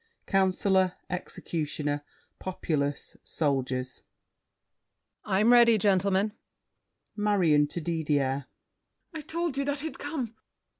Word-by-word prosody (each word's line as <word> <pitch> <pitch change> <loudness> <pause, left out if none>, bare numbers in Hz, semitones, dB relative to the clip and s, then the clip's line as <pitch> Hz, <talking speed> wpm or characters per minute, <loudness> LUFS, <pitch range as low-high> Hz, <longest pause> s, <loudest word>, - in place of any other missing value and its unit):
Councilor, 190 -1 +2 0.2
Executioner, 150 -4 -3 0.4
Populace, 145 -6 -2
Soldiers 130 -4 -2 1.2
COUNCILOR. 195 - 0
I'm 220 +4 +5
ready, 235 -2 +7
Gentlemen! 200 +1 +2 0.8
MARION 180 -9 +3
(to 175 - -5
Didier). 145 -4 0 0.7
I 315 - -5
told 330 -1 -3
you 280 - 0
that 285 0 -2
he'd 320 +1 -6
come! 280 -6 -4
185 Hz, 95 wpm, -28 LUFS, 150-220 Hz, 1.2 s, ready